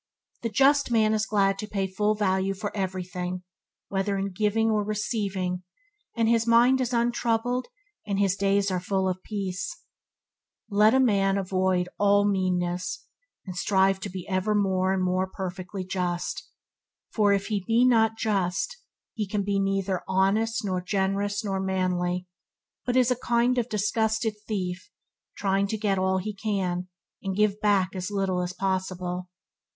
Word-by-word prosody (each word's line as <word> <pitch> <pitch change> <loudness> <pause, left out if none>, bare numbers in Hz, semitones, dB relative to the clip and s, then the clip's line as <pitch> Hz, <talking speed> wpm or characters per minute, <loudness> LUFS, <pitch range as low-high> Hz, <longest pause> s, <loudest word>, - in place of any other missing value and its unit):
The 230 - -1
just 275 +6 +4
man 220 -2 +3
is 215 0 0
glad 195 -2 +2
to 215 - -4
pay 200 -2 -1
full 210 +3 0
value 195 -1 +1
for 205 +1 -5
everything, 185 -2 -3 0.5
whether 195 +1 0
in 195 0 -2
giving 215 +3 +1
or 210 -1 +1
receiving 200 -4 -2 0.6
and 230 -1 +3
his 230 0 +2
mind 240 +3 +5
is 250 -1 -1
untroubled 240 +1 0 0.4
and 200 -1 -1
his 195 -1 +2
days 200 0 +1
are 185 - 0
full 190 +1 0
of 185 0 -2
peace. 190 -4 -4 0.9
Let 210 +4 +5
a - - +5
man 200 -6 +3
above 195 -1 -4
all 185 0 +2 0.5
avoid 205 0 +2
meanness, 185 +2 -1 0.4
and 185 -2 -6
strive 190 +1 +2
to - - -5
be 185 -1 -7
ever 195 +2 0
more 190 -2 +2
and 190 -1 +1
more 185 +1 +1
perfectly 185 0 -5
just, 180 -2 -3 0.6
for 210 -2 +3
if 200 +1 0
not 225 +2 +3
just, 205 - -1 0.4
he 215 -4 -3
can 200 0 -1
be 200 0 0
neither 195 -2 0
honest, 215 +4 +1
nor 185 -2 -1
generous, 200 +2 -1
nor 195 -2 -1
manly, 180 -1 -1 0.6
but 250 +1 +2
is 250 -1 +4
a - - +3
kind 240 +1 +1
of 240 0 -2
disguised 220 +2 0 0.2
thief 185 - -3 0.5
trying 195 0 +1
to 220 - -2
get 200 -3 0
all 190 0 +2
he 210 +3 -3
can, 190 -3 -2 0.3
and 195 -1 -3
give 210 0 +2
back 195 -2 +2
as 185 +1 -3
little 195 -3 0
as 180 0 -2
possible. 185 -1 -2
195 Hz, 155 wpm, -26 LUFS, 185-215 Hz, 0.9 s, mind